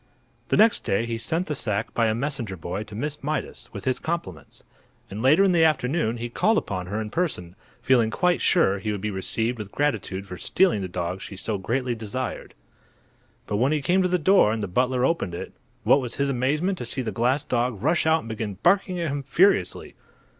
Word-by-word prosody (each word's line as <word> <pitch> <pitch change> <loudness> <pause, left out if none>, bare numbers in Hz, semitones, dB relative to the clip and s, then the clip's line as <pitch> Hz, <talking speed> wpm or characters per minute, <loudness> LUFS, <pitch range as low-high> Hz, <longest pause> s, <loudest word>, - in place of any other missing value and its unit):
The - - +1
next 220 +1 +5
day 100 +4 0
he 115 -1 -3
sent 165 +10 -1
the 155 - -3
sack 110 -5 -2
by 115 -1 +2
a 110 - +1
messenger 120 -6 -3
boy 85 +4 -4
to 105 0 -10
Miss 150 +6 -4
Mydas, 155 +2 -4
with - - -8
his 130 -1 0
compliments, 95 - -5 0.5
and 105 +3 -5
later 150 +9 +5
in 195 - +4
the 170 -2 +4
afternoon 135 -5 +1
he 120 +1 -4
called 210 - +2
upon 90 - -3
her 105 +4 -3
in 110 -1 -5
person, 95 - -2 0.3
feeling 120 -3 +4
quite 180 +9 +1
sure 100 - +3
he 105 +2 -2
would 105 - -3
be 105 +2 -3
received 110 +5 -2
with 105 -2 -7
gratitude 115 -9 -1
for 90 -2 -8
stealing 185 - +2
the 95 - -3
dog 90 +1 -4
she 100 - -8
so 105 +1 -2
greatly 125 +5 -1
desired. 115 +3 -5 0.9
But 105 - -2
when 130 +7 +2
he 155 - +1
came 180 +7 +2
to 185 - +1
the 180 - +2
door 180 - +4
and 110 -1 -2
the - - -2
butler 125 +6 +1
opened 130 - -1
it, - - -7 0.3
what 140 - +5
was 120 -2 -5
his 140 0 0
amazement 150 +9 0
to - - -4
see 130 +2 -2
the 110 - -3
glass 125 +7 +1
dog 120 -3 -1
rush 160 +2 +2
out 160 0 +4
and 115 - -10
begin 110 -2 -4
barking 185 0 +3
at 170 -2 -1
him 140 0 -2
furiously. 140 - +2
125 Hz, 220 wpm, -25 LUFS, 105-155 Hz, 0.9 s, next